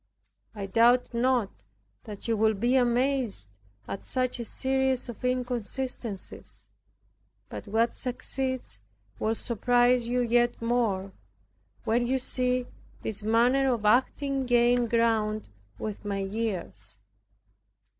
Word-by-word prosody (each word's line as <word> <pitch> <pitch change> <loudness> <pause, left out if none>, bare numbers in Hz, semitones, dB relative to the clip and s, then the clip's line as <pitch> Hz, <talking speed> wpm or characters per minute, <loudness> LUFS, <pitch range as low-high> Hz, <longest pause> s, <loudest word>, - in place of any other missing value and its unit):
I 200 -2 -4
doubt 235 +5 +3
not 240 -3 +1 0.5
that 210 +1 -8
you 230 - +2
will 220 0 +3
be 240 +6 +1
amazed 250 - +1 0.4
at 195 - -5
such 255 -1 -1
a 235 - -4
series 265 +1 0
of 240 - -9
inconsistencies; 250 -3 -4 0.8
but - - -8
what 225 +3 +1
succeeds 260 - -4 0.4
will 220 +1 0
surprise 245 +1 +2
you 250 +1 +1
yet 240 0 +2
more, 230 -5 0 0.7
when 235 +2 +1
you 265 +2 +2
see 250 -1 0 0.4
this 215 -1 -2
manner 245 +5 +3
of 225 -3 -2
acting 265 +4 +2
gain 240 0 +3
ground 220 -2 +1 0.3
with 210 - -5
my 200 -1 -2
years. 195 - -4
240 Hz, 115 wpm, -28 LUFS, 215-250 Hz, 0.8 s, doubt